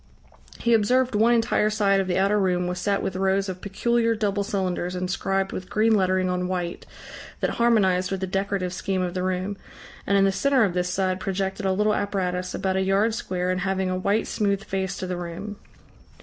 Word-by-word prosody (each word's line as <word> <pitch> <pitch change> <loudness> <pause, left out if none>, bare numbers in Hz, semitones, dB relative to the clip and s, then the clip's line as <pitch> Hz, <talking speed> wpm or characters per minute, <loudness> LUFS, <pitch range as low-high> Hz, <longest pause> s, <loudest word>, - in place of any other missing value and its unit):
He 235 - +1
observed 250 +4 +3
one 220 +3 +4
entire 225 -2 +2
side 200 -2 +2
of 190 - -1
the 180 - 0
outer 200 +2 +3
room 180 -2 +1
was 180 0 -3
set 200 +2 0
with 185 - -3
rows 195 +1 +1
of 185 -1 -6
peculiar 230 +3 +1
double 205 -2 0
cylinders 185 -3 -2
inscribed 195 +1 -1
with 185 - -6
green 220 +1 +3
lettering 185 -2 +2
on 180 0 -1
white 180 -2 -4 0.5
that - - 0
harmonized 190 -6 +2
with 195 - -2
the - - 0
decorative 195 -1 -2
scheme 190 0 -1
of 175 -1 -3
the 185 - -2
room, 185 +2 -2 0.5
and 200 - +3
in 195 - +5
the 195 - +3
centre 260 +6 +2
of 195 -4 +1
this 180 0 -1
side 185 0 0
projected 195 +1 -2
a - - +2
little 210 +3 +2
apparatus 185 -3 -2
about 190 0 -1
a - - +2
yard 195 +4 +2
square 180 -5 -2
and 185 0 -1
having 190 -1 -1
a - - 0
white 200 +4 +1
smooth 200 -1 -1
face 190 -1 -3
to - - -4
the 180 -1 -3
room. 175 +4 -6
195 Hz, 205 wpm, -24 LUFS, 185-205 Hz, 0.5 s, in